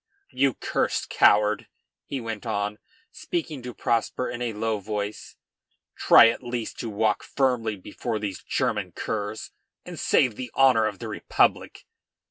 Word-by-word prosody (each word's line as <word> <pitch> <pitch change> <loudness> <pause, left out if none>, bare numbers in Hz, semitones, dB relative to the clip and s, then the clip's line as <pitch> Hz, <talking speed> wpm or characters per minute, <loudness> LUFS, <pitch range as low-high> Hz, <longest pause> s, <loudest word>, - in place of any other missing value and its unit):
"You 135 -1 +2
cursed - - -1
coward!" 105 0 +4 0.4
he 140 - -4
went 115 -3 -5
on, 100 +1 -2 0.3
speaking 160 -5 -4
to 125 0 -6
Prosper 120 +2 -1
in 120 - -6
a 120 -1 -1
low 110 0 -2
voice, 105 +1 -5 0.6
"try 115 - +7
at 115 - -3
least 120 -2 -5
to 115 - -4
walk 105 0 +1
firmly 125 -5 0
before 110 +4 -5
these 100 -4 -5
German - - -1
curs, 105 0 -4 0.3
and - - -8
save 120 -5 +2
the 125 -1 -5
honor 125 -5 +5
of 105 -2 -5
the - - -7
Republic." - - 0
110 Hz, 145 wpm, -25 LUFS, 105-125 Hz, 0.6 s, try